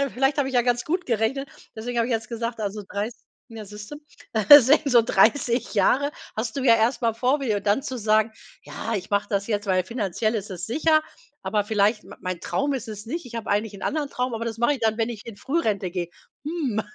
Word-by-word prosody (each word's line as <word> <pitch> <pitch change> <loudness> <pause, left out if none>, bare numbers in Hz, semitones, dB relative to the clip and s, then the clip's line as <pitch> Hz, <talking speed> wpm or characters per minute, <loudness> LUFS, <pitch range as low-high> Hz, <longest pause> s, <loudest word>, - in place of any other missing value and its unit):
Vielleicht 270 +4 +1
habe 270 -2 +1
ich 260 - -6
ja 245 - +4
ganz 245 0 0
gut 355 +3 -2
gerechnet. 245 +4 0 0.3
Deswegen 240 +2 -3
habe 230 - +2
ich 250 - -1
jetzt 220 -1 -3
gesagt, 230 -1 -4
also, 205 0 -3
30 210 +3 -4 0.3
ja, 225 -2 -8
siehst 210 +1 -10
du, - - -5 0.6
sä 265 +6 +5
so 245 -4 +5
30 235 +3 +2
Jahre 265 +8 +3 0.2
hast 220 +3 -3
du 270 - -2
ja 230 -3 +6
erst 235 +3 +1
mal 230 -1 +2
vor 255 +5 +1
dir. 220 -6 0
Und 200 - -14
dann 205 +7 +2
zu 260 -3 -5
sagen: 215 +1 +2 0.3
„Ja, 225 - -5
ich 185 - -6
mache 200 0 0
das 200 -1 -1
jetzt, 205 -2 -2
weil 185 -2 +2
finanziell 215 0 -2
ist 210 -1 -3
es 180 -1 -5
sicher, 310 +5 +3 0.4
aber 210 -1 0
vielleicht 210 +1 +1
m - - -11
mein 185 -2 -4
Traum 285 +1 -1
ist 255 -5 -4
es 210 -1 -7
nicht. 305 +4 -5
Ich 235 - -11
habe 230 -1 -4
eigentlich 205 +1 0
'n 195 - -10
anderen 300 -1 -1
Traum, 250 -2 -2
aber 230 +1 -3
das 225 -1 -4
mache 240 +5 +2
ich 265 - -8
dann, 220 -1 +1
wenn 225 +1 0
ich 220 -2 -9
in 225 - -8
Frührente 215 - -1
gehe.“ 175 -2 -3 0.4
Hm. 290 -9 -1
230 Hz, 235 wpm, -24 LUFS, 210-255 Hz, 0.6 s, ja